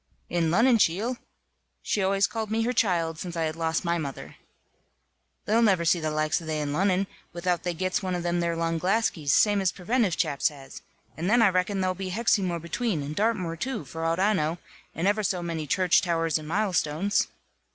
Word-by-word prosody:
"In 170 -2 +1
Lonnon, 230 +7 +4
cheel!" 215 +9 +1 0.7
she 205 - 0
always 195 +1 +2
called 220 0 -4
me 225 +1 0
her 245 +2 0
child, 165 -8 +1
since 175 -1 -6
I 165 - 0
had 155 0 -2
lost 165 +1 -1
my 170 0 +1
mother 140 -4 -6 1.1
"they'll 225 +2 +3
never 190 -7 +3
see 175 +1 +3
the 155 -1 -2
likes 155 +2 0
of 165 - -10
they 155 -1 -1
in 145 -1 -2
Lonnon, 190 +3 +2 0.3
without 175 0 -1
they 175 -1 -3
gits 185 +3 -1
one 185 -2 -2
of 175 - -3
them 175 0 0
there 170 -1 0
long 165 0 -1
glaskies, 180 -6 +1
same 205 +3 +4
as 190 -2 +2
preventive 200 -1 0
chaps 140 - +1
has, 135 -3 -12 0.3
and 170 +4 -2
then 235 +1 +5
I 210 - +6
reckon 185 +2 0
there'll 185 0 +1
be 190 +1 -5
Hexymoor 190 -4 +1
between, 170 0 -2
and 145 +2 -5
Dartmoor 200 -5 0
too, 235 - -4
for 160 +5 -6
out 165 +2 0
I 205 +3 +3
know, 160 -2 0 0.4
and 170 +4 0
ever 210 +1 +2
so 180 -3 -1
many 165 -3 -4
church 180 +4 +3
towers 165 -2 0
and 155 - -9
milestones." 190 0 0
180 Hz, 205 wpm, -26 LUFS, 165-200 Hz, 1.1 s, I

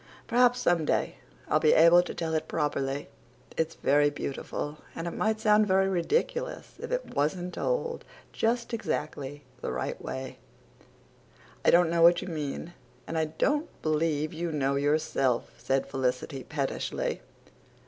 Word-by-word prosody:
Perhaps 245 +1 +4
some 175 -8 +2
day - - 0 0.3
I'll 155 - +3
be 155 -1 +5
able 170 +2 +7
to 180 - -6
tell 160 -1 -2
it 155 - -1
properly. 145 -2 -1 0.5
It's 160 0 -1
very 145 +1 +3
beautiful 145 +1 -5 0.2
but 165 - -4
it 170 - -2
might 220 +3 0
sound 215 -1 +4
very 190 0 +3
ridiculous 465 - -1
if 475 +1 -6
it - - -2
wasn't 175 +5 0
told 480 -1 -1 0.3
just 235 +1 0
exactly 145 -9 -3 0.2
the - - -3
right - - -3
way." 130 0 -6 1.2
"I - - +5
don't 170 -1 +5
know 170 0 +2
what 170 +1 +7
you 185 - -6
mean, 155 +1 -4 0.3
and 165 - -5
I 160 -1 +2
don't 290 - 0
believe 155 0 0
you 165 +1 -3
know 140 -2 0
yourself," 140 -3 +1
said 135 0 0
Felicity 130 0 -2
pettishly. 140 -3 -2
160 Hz, 150 wpm, -28 LUFS, 145-190 Hz, 1.2 s, able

